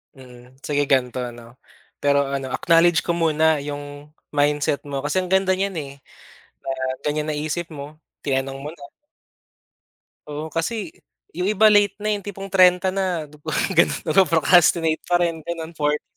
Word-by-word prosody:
Mm, 125 -1 -15
sige 145 -1 0
gan'to, 130 -2 +1 0.2
'no, 120 +1 -15 0.4
pero 140 0 +3
ano, 135 -1 -3
acknowledge 170 -1 +4
ko - - -1
muna 160 -2 +2
yung 145 0 -7 0.2
mindset 145 0 +1
mo, 140 -1 -4
kasi 150 +6 0
ang 185 - -3
ganda 190 0 +3
niyan, 195 0 -2
eh, 140 -2 -7 0.7
na - - -7 0.4
ganyan 150 +1 -1
naisip 155 +3 -3
mo, 145 +1 -9 0.2
tinanong 135 -1 -2
mo 145 - -6
na. 145 -3 -12 1.4
Oo, 150 +2 -6
kasi, 180 +2 -3 0.4
yung 180 +3 -2
iba, 215 +1 +5
late 205 -1 +4
na, 215 - +1
yung 205 - 0
tipong 195 -1 -7
30 185 0 +5 0.4
dupa 150 0 -6 0.2
gano'n, - - +2
nag-pro-procrastinate 165 -2 +4
pa 175 0 +3
rin, 165 -2 -1
gano'n, 165 0 -6
40's 150 -2 -1
155 Hz, 150 wpm, -22 LUFS, 145-175 Hz, 1.4 s, iba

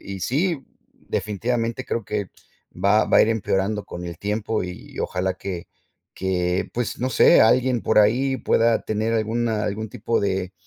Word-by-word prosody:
y - - -7
sí, 155 - 0 0.3
definitivamente 115 +4 -2
creo 115 - -2
que 105 -2 -3 0.5
va 105 +2 +4
va - - +3
a - - +8
ir - - +3
empeorando 105 -1 -1
con 90 0 -7
el 85 -1 -7
tiempo 105 +2 -1
y 90 0 -8
ojalá 95 0 -1
que 90 -3 -6 0.5
que, 90 -1 -1
pues, 120 -1 -3
no 130 - 0
sé, - - +6
alguien 125 +1 +3
por 110 - +1
ahí 130 +6 +3
pueda 115 -2 +2
tener 110 +1 -1
alguna 110 0 0
algún 105 +2 -3
tipo 115 +3 -1
de 95 -2 -2
110 Hz, 165 wpm, -23 LUFS, 95-115 Hz, 0.5 s, a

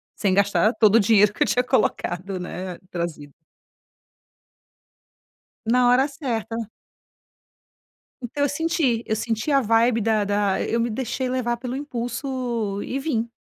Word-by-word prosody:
sem 195 -3 +1
gastar 200 +3 +3
todo 215 -2 +4
o 230 - +7
dinheiro 210 0 +5
que - - +1
eu - - -1
tinha 225 +5 +2
colocado, 195 -7 -1
né, 180 0 -6
trazido. 170 -5 -5 2.3
Na 245 +2 +4
hora 255 +3 +4
certa. 245 -7 -4 1.7
Então 285 +5 -2
eu 285 - +2
senti. 285 -6 0
Eu 220 - 0
senti 225 +4 -2
a 275 -1 +4
vibe 230 +1 +3
da 215 -1 +2
da 205 -1 0
eu 230 - -1
me 235 +1 0
deixei 260 +2 -2
levar 250 -2 -1
pelo 250 +1 -5
impulso 240 -5 -3
e 270 - -3
vim. 235 -6 -2
230 Hz, 140 wpm, -23 LUFS, 205-255 Hz, 2.3 s, o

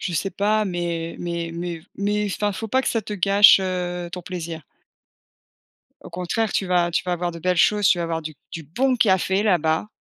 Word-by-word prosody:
Je 180 - -3
sais 195 +4 -1
pas, 210 +3 +1
mais 170 -3 -3
mais 170 -1 -4
mais 170 -1 -5 0.2
mais 205 +1 0
enfin 210 - 0
il - - 0
ne - - -5
faut 225 +2 -5
pas 260 +4 +1
que - - -1
ça 225 - 0
te 210 - -7
gâche, 200 +1 +6
heu, 180 -2 -3
ton 180 - -6
plaisir. 170 -3 -6 1.4
Au - - -11
contraire, 180 +5 -2
tu 195 - 0
vas 175 -1 +2
tu - - 0
vas 180 -1 -1
voir 175 0 -2
de 170 - -9
belles 180 +2 0
choses, 205 +2 +3
tu 175 - +4
vas 170 - -1
avoir 165 -1 -3
du 155 -1 -7 0.2
du 165 - -6
bon 250 - 0
café, 190 -2 +2
là-bas. 165 -4 +1
180 Hz, 220 wpm, -22 LUFS, 170-205 Hz, 1.4 s, gâche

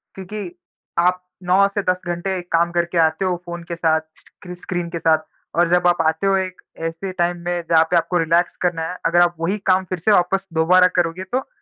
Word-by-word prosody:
क्योंकि 190 -1 -7 0.4
आप 180 +1 +2 0.2
9 190 +3 +4
से 205 - +1
10 180 0 +1
घंटे 180 +2 -2
काम 170 +1 +2
करके 175 0 -1
आते 160 +4 +2
हो 180 -1 +1
फ़ोन 175 0 -7
के - - -2
साथ, 160 -1 +1 0.2
स्क्रि 180 0 -12
स्क्रीन 175 -1 -4
के 170 -1 -5
साथ, 160 -1 +3 0.4
और 175 0 +2
जब 180 0 +3
आप 175 -1 +3
आते 160 +5 0
हो 195 - +3
एक 185 -1 -4 0.3
ऐसे 175 +4 -5
टाइम 175 0 +1
में 175 0 -1
जहाँ 160 -1 +6
पे 175 - +4
आपको 175 +1 0
रिलैक्स 170 +2 +1
करना 175 -2 0
है, 180 - -6
अगर 175 +1 +4
आप 175 0 +3
वही 185 +6 -1
काम 185 +1 +3
फिर 185 -1 -4
से 210 +6 +2
वापस 195 +2 +1
दोबारा 180 +3 +5
करोगे, 175 +1 0
तो 250 +8 -3
175 Hz, 215 wpm, -20 LUFS, 170-185 Hz, 0.4 s, जहाँ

